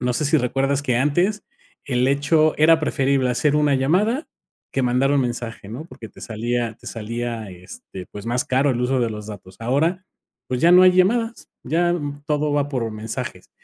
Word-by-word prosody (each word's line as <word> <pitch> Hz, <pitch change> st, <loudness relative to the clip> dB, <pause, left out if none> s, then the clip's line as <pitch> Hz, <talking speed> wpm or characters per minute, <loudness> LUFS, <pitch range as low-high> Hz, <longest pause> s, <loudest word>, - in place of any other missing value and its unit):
no 125 Hz, 0 st, 0 dB
sé 150 Hz, -, 0 dB
si 155 Hz, +2 st, +3 dB
recuerdas 135 Hz, +2 st, 0 dB
que 125 Hz, -4 st, 0 dB
antes, 175 Hz, -, +1 dB, 0.4 s
el 125 Hz, -1 st, +1 dB
hecho 155 Hz, +3 st, +3 dB
era 160 Hz, +1 st, +6 dB
preferible 135 Hz, -3 st, +1 dB
hacer 145 Hz, +5 st, +1 dB
una 150 Hz, -2 st, +3 dB
llamada 200 Hz, -, +1 dB, 0.5 s
que 135 Hz, -, 0 dB
mandar 125 Hz, +3 st, +2 dB
un 140 Hz, -, +3 dB
mensaje, 120 Hz, -4 st, -5 dB
¿no?, 125 Hz, +8 st, -7 dB
porque 115 Hz, -9 st, -11 dB
te -, -, -17 dB
salía 115 Hz, 0 st, -2 dB
te -, -, -18 dB
salía, 115 Hz, -1 st, -4 dB
este, 90 Hz, +1 st, -10 dB
pues, 105 Hz, 0 st, -8 dB
más 120 Hz, +1 st, 0 dB
caro 135 Hz, +2 st, +2 dB
el 120 Hz, -1 st, -1 dB
uso 130 Hz, +1 st, +1 dB
de 115 Hz, -2 st, 0 dB
los 105 Hz, -1 st, -7 dB
datos. 95 Hz, -3 st, -10 dB
Ahora, 160 Hz, +10 st, 0 dB, 0.4 s
pues, 125 Hz, -1 st, -2 dB
ya 170 Hz, -, +5 dB
no 180 Hz, +1 st, +8 dB
hay 185 Hz, 0 st, +7 dB
llamadas, 225 Hz, +6 st, +1 dB, 0.2 s
ya 175 Hz, +5 st, +1 dB, 0.3 s
todo 150 Hz, 0 st, 0 dB
va 145 Hz, -1 st, +1 dB
por 120 Hz, -5 st, -2 dB
mensajes. 110 Hz, +1 st, -6 dB
135 Hz, 190 wpm, -22 LUFS, 120-155 Hz, 0.5 s, no